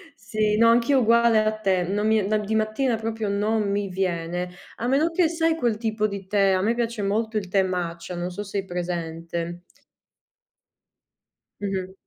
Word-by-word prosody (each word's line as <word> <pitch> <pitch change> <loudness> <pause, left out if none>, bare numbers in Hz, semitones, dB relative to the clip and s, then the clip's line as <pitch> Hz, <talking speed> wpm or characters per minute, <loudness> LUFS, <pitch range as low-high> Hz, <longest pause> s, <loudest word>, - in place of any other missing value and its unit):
Sì, 215 -1 0
no, 230 +1 +6
anch'io 240 +4 +4
uguale 235 -1 +4
a 215 - +2
te, 190 -3 +1
non 205 +4 -1
mi 220 0 +3
no, 215 +2 +1
di 210 +1 -2
mattina 220 +3 +1
proprio 225 -1 -3
non 210 +1 0
mi 200 0 -1
viene. 180 -1 -2 0.3
A 240 - -2
meno 295 +6 +2
che 335 0 +3
sai 330 0 +1
quel 240 -8 +1
tipo 215 -1 0
di 200 -2 -6
tè, 195 0 +3
a 185 - +2
me 220 +4 +2
piace 235 -2 -2
molto 220 +3 -1
il 195 -3 -3
tè 195 +1 +3
matcha, 175 -1 -3
non 175 +1 -3
so 190 - -5
se 200 0 -3
hai 195 - -5
presente. 170 -1 -4 2.0
Mh-mh. 190 -2 -3
205 Hz, 180 wpm, -24 LUFS, 185-225 Hz, 2.0 s, no